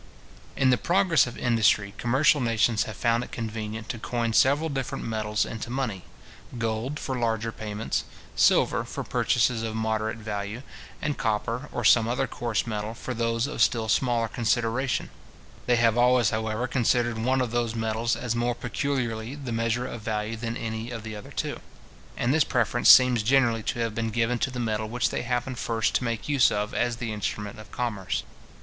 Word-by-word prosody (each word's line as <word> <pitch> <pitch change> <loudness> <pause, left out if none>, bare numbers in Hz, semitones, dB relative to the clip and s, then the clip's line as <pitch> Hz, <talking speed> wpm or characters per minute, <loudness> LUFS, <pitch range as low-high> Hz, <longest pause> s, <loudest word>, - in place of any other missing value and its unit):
In 130 -2 +3
the 125 - +3
progress 175 -6 +3
of 120 - -8
industry, 110 -4 +2
commercial 135 +4 +3
nations 115 -2 +2
have 110 - -7
found 115 +1 +1
it - - -10
convenient 110 -1 -5
to 120 -3 -4
coin 115 0 -2
several 145 +7 +4
different 135 -4 -3
metals 110 -2 -1
into 115 +1 -6
money; 120 -8 -3 0.5
gold 115 +5 -2
for 130 - -3
larger 115 -1 0
payments, 110 0 -3 0.3
silver - - +3
for - - -5
purchases 120 -1 +1
of 110 -1 -3
moderate 110 0 -1
value, 105 +2 -5 0.4
and 145 -1 -2
copper, 115 +6 -1
or 120 - -3
some 115 +1 +6
other 125 +3 0
coarse 120 -3 -2
metal, 110 0 -4
for 130 - -5
those 115 0 0
of 145 - -4
still 115 -2 +3
smaller 120 -1 +1
consideration, 120 +3 0 0.6
They 125 - +4
have 115 -1 +3
always, 125 -3 +4
however, 110 +2 -1
considered 120 -2 +1
one 130 +4 +1
of 125 -3 -1
those 120 -1 -1
metals 110 +1 0
as 120 -2 -2
more 120 0 0
peculiarly 120 -1 -2
the 135 -4 -6
measure 115 +2 0
of 115 -3 -6
value 110 0 -2
than 115 +1 -4
any 110 +1 -4
of 115 -3 -6
the 110 -1 -6
other 105 - -9
two; - - -3 0.6
and 125 +3 +1
this 155 -1 +4
preference 120 -1 +2
seems 125 -3 +8
generally 120 -1 +3
to 115 - -3
have 115 -1 -1
been 115 +1 -2
given 115 +2 0
to - - 0
the 125 -1 -6
metal 110 -2 -1
which 125 +2 0
they - - -2
happen 125 +1 -2
first 115 -2 -1
to - - +1
make 115 -2 -3
use 140 -3 +4
of 105 +3 -2
as 120 -1 0
the 115 -2 -4
instrument 105 0 -4
of 110 - -12
commerce. 110 -6 -2
115 Hz, 185 wpm, -26 LUFS, 110-125 Hz, 0.6 s, seems